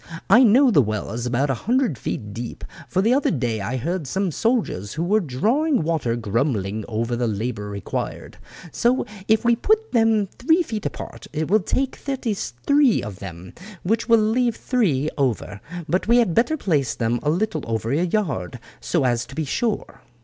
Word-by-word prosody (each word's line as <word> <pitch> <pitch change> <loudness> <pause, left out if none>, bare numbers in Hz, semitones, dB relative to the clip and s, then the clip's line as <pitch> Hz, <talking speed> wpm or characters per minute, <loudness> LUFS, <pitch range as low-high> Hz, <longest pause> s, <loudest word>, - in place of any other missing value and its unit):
I 245 - +8
know 255 +3 +6
the 145 - +6
well 110 -3 -3
is 120 +2 -3
about 130 +3 +1
a 135 - -5
hundred 250 - +2
feet 105 -2 -5
deep, 115 +2 -6 0.2
for 190 +1 0
the 230 +4 +4
other 275 +2 +2
day 120 - -1
I 120 +7 -2
heard 165 +4 -3
some 190 +8 -1
of 190 - 0
the - - -6
soldiers 215 - -1
who 160 - -2
were 205 +5 +3
drawing 220 - +1
water 155 -8 0
grumbling 110 -2 -1
over 115 +2 -2
the 120 0 0
labour 105 -1 -3
required. 100 -1 -5 0.3
So 245 +2 +1 0.2
if 220 +2 +3
we 235 0 +5
put 435 - +1
them 225 -3 +3
three 320 +8 +3
feet 220 -8 -3
apart - - -8
it 155 +2 -2
will 215 - +6
take 260 +7 -1
thirty 260 -5 -2
three 235 - +1
of 100 -2 -7
them, 90 -1 -9 0.3
which 225 +5 0
will 230 - +7
leave 225 +2 +2
three 160 - 0
over; 110 -6 -1 0.3
but 185 +4 0
we 235 +2 +5
had 230 -8 +3
better 245 - +2
place 145 - 0
them 120 0 0
a 150 - 0
little 170 -1 0
over 115 0 -2
a 155 +5 +2
yard 155 - -1 0.2
so - - 0
as 120 -1 0
to 135 - -11
make 155 -2 -1
sure." 230 -4 -2
160 Hz, 195 wpm, -22 LUFS, -, 0.3 s, I